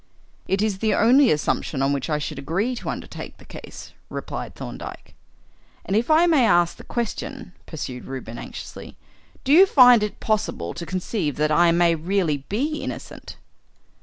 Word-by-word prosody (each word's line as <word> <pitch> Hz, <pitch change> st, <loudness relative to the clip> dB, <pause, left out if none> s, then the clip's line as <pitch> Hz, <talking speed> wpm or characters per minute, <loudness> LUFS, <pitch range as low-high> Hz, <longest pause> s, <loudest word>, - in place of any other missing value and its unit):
"It 195 Hz, +2 st, +1 dB
is 205 Hz, -3 st, -1 dB
the 220 Hz, 0 st, +1 dB
only 255 Hz, +5 st, +5 dB
assumption 145 Hz, -2 st, 0 dB
on 140 Hz, +1 st, +2 dB
which 140 Hz, +3 st, -3 dB
I 150 Hz, -, +1 dB
should 150 Hz, -1 st, -5 dB
agree 185 Hz, -, -1 dB
to -, -, -5 dB
undertake -, -, -7 dB
the -, -, -17 dB
case," -, -, -11 dB, 0.2 s
replied -, -, -6 dB
Thorndyke. -, -, -8 dB, 0.7 s
"And 195 Hz, -, -1 dB
if 230 Hz, +6 st, +1 dB
I 315 Hz, +2 st, +5 dB
may 315 Hz, -7 st, +4 dB
ask 175 Hz, -6 st, +3 dB
the -, -, -11 dB
question 240 Hz, -1 st, -5 dB
" -, -, -33 dB
pursued 130 Hz, -6 st, -6 dB
Reuben 125 Hz, -3 st, -7 dB
anxiously, -, -, -9 dB, 0.5 s
"do 275 Hz, -, +2 dB
you 375 Hz, +5 st, +8 dB
find 250 Hz, -, +7 dB
it 210 Hz, -1 st, -3 dB
possible 205 Hz, -, -1 dB
to 170 Hz, -1 st, -7 dB
conceive 185 Hz, -, -2 dB
that 155 Hz, +1 st, 0 dB
I 170 Hz, +2 st, +5 dB
may 170 Hz, 0 st, +4 dB
really 165 Hz, -1 st, 0 dB
be 290 Hz, +9 st, -1 dB
innocent?" -, -, -7 dB
190 Hz, 170 wpm, -23 LUFS, 155-240 Hz, 0.7 s, you